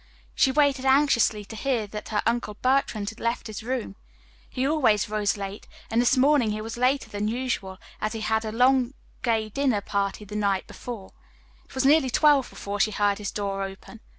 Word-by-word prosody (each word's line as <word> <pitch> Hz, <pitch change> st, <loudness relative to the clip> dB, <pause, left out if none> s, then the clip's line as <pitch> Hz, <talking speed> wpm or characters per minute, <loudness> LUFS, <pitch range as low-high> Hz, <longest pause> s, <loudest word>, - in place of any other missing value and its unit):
She 265 Hz, -, +3 dB
waited 280 Hz, -2 st, +2 dB
anxiously 265 Hz, -6 st, +3 dB
to 220 Hz, -, -9 dB
hear 240 Hz, -2 st, -1 dB
that 210 Hz, +1 st, -8 dB
her 210 Hz, -1 st, 0 dB
Uncle 230 Hz, -3 st, -1 dB
Bertrand 245 Hz, -4 st, 0 dB
had 225 Hz, -, -16 dB
left 235 Hz, +1 st, -2 dB
his 215 Hz, -2 st, -6 dB
room. 240 Hz, -3 st, -3 dB, 0.5 s
He 260 Hz, +1 st, -1 dB
always 250 Hz, -10 st, +2 dB
rose 210 Hz, -1 st, 0 dB
late, 200 Hz, +1 st, -6 dB, 0.2 s
and 230 Hz, +1 st, +3 dB
this 245 Hz, +2 st, +3 dB
morning 275 Hz, -3 st, +4 dB
he 210 Hz, 0 st, -2 dB
was 225 Hz, +1 st, -5 dB
later 255 Hz, +3 st, +1 dB
than 205 Hz, +1 st, -3 dB
usual 225 Hz, -5 st, -3 dB, 0.2 s
as 215 Hz, +1 st, -1 dB
he 225 Hz, -, -5 dB
had 220 Hz, 0 st, +1 dB
had 220 Hz, -, -4 dB
a 225 Hz, -, -7 dB
long 255 Hz, +1 st, +3 dB, 0.3 s
gay 225 Hz, -3 st, 0 dB
dinner 260 Hz, -2 st, +1 dB
party 200 Hz, +1 st, -2 dB
the 205 Hz, +1 st, -9 dB
night 200 Hz, -2 st, 0 dB
before. 225 Hz, -6 st, -8 dB, 0.5 s
It -, -, -17 dB
was 260 Hz, 0 st, 0 dB
nearly 285 Hz, -1 st, +5 dB
twelve 285 Hz, 0 st, +4 dB
before 200 Hz, +1 st, -6 dB
she 215 Hz, +2 st, +3 dB
heard 205 Hz, -1 st, +1 dB
his 205 Hz, -1 st, -3 dB
door 200 Hz, -1 st, -3 dB
open. 195 Hz, +3 st, -8 dB
225 Hz, 200 wpm, -25 LUFS, 210-260 Hz, 0.5 s, nearly